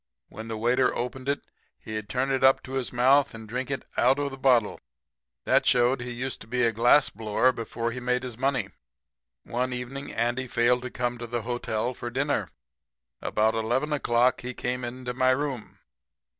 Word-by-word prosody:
When 110 +2 -8
the 110 -1 -4
waiter 125 +3 +2
opened 130 +2 -4
it 140 - 0 0.4
he'd 110 -1 -6
turn 130 +2 0
it 135 0 0
up 135 0 +5
to 130 - -10
his 135 -2 -2
mouth 130 +2 +4
and 110 -1 -9
drink 125 +4 -3
it 135 - -3
out 130 +3 +4
of 145 -1 -2
the 135 - -8
bottle. 125 -5 +3 0.6
That - - +3
showed 125 +1 +3
he 120 - -5
used 125 +2 -4
to - - -11
be 125 +1 0
a 115 -1 +3
glassblower 115 0 +3
before 115 0 -3
he 125 - -5
made 125 0 0
his 125 -3 -6
money. 130 -5 0 0.7
"One 125 +2 -2
evening 125 +3 -5
Andy 120 +3 -1
failed 125 0 +2
to 125 - -5
come 120 -1 -2
to 120 - -5
the 120 -1 -3
hotel 120 0 -2
for 120 - -6
dinner. 140 +4 -1 0.7
About 110 +1 +1
11 120 +7 0
o'clock 125 -3 +2
he 125 0 -5
came 125 +1 -2
into 125 +1 -5
my 130 +1 +2
room. 130 -3 -2
125 Hz, 185 wpm, -27 LUFS, 120-130 Hz, 0.7 s, up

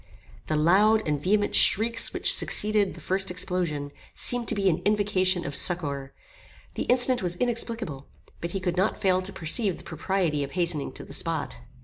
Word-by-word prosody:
The 155 - -1
loud 200 +7 +3
and 150 -2 -1
vehement 205 +4 0
shrieks 230 +3 +3
which - - +4
succeeded 210 -2 +1
the - - -11
first 190 +1 -2
explosion, 175 -5 -2 0.2
seemed 245 -2 +2
to - - -1
be 200 -1 0
an 175 -1 +1
invocation 195 -3 0
of 145 - -5
succour. 140 -6 0 0.6
The - - -4
incident 250 0 +4
was 175 -2 -1
inexplicable; 225 - -2 0.3
but 170 0 -5
he 195 - -2
could 180 -1 -3
not 190 +4 0
fail 185 -2 +1
to 190 +1 -6
perceive 190 +3 +1
the - - -14
propriety 165 -2 -2
of 140 - -8
hastening 170 -5 -1
to - - -9
the - - -12
spot. - - -4
185 Hz, 175 wpm, -25 LUFS, 160-210 Hz, 0.6 s, which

